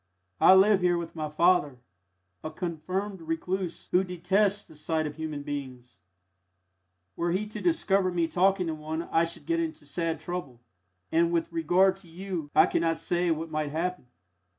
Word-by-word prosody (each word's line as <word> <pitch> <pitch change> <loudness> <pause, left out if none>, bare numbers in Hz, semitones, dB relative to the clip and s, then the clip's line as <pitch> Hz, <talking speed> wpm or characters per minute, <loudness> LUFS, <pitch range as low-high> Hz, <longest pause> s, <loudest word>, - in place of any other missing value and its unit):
I 190 - +8
live 195 0 +5
here 175 -1 +3
with 170 -1 -6
my 155 -2 -3
father 155 -3 +3 0.7
a - - -3
confirmed 180 +4 -4
recluse 170 +3 -3
who 180 +1 +4
detests 195 +3 +1
the 160 - -16
sight 155 +1 -1
of 150 -1 -5
human 155 -2 -5
beings; 130 -7 -7 1.2
were 170 0 -1
he 190 +4 0
to 210 - -7
discover 200 - +2
me 170 -2 +1
talking 185 +2 +2
to 165 - -2
one 155 +1 -4
I 165 0 +2
should 165 - -7
get 335 0 0
into 320 -1 -4
sad 165 -2 -2
trouble, 155 -7 -6 0.5
and 170 +1 +3
with 170 0 0
regard 180 +4 +3
to 195 -2 -14
you 175 -3 -5
I - - +8
could - - 0
not 165 -1 +1
say 175 +2 0
what 160 0 -2
might 155 -1 -1
happen." 165 -1 -3
170 Hz, 175 wpm, -28 LUFS, 160-185 Hz, 1.2 s, I